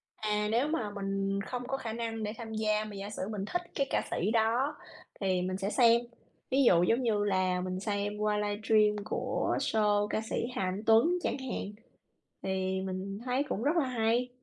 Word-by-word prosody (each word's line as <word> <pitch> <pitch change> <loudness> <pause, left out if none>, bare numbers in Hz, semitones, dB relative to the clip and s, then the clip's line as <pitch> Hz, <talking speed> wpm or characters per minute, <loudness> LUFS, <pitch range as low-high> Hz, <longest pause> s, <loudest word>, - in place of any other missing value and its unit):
À, 210 -1 0
nếu 240 +6 +2
mà 305 -9 -1
mình 195 -1 -2
không 245 +4 -5
có 270 - -1
khả 225 -4 -5
năng 225 -1 -3
để 210 +1 -2
tham 225 -2 -7
gia 215 -1 +1
mà 210 -1 -8
giả 200 +1 -5
sử 200 -3 -4
mình 205 -2 -3
thích 355 +10 -2
cái 275 -1 +1
ca - - +1
sĩ 200 +5 0
đó 235 +6 +2 0.5
thì 185 -2 +1
mình 185 +1 -2
sẽ 195 +1 -2
xem, 235 +1 +5 0.5
ví 270 +2 +3
dụ 175 -8 +6
giống 230 +7 +3
như 210 -3 +2
là 185 -2 +1
mình 185 0 -3
xem 205 0 -2
qua 210 0 +1
livestream 210 0 +2
của - - -1
show 210 -1 +2
ca 220 - -1
sĩ 235 - -1
Hà - - -1
Anh 190 +3 -2
Tuấn 225 +9 +5
chẳng - - 0
hạn, 255 -6 -4 0.7
thì 190 0 -1
mình 190 +1 -4
thấy 255 +2 +1
cũng 215 - -2
rất 295 +5 +2
là 305 - +3
hay. 240 0 +1
210 Hz, 205 wpm, -31 LUFS, 195-235 Hz, 0.7 s, dụ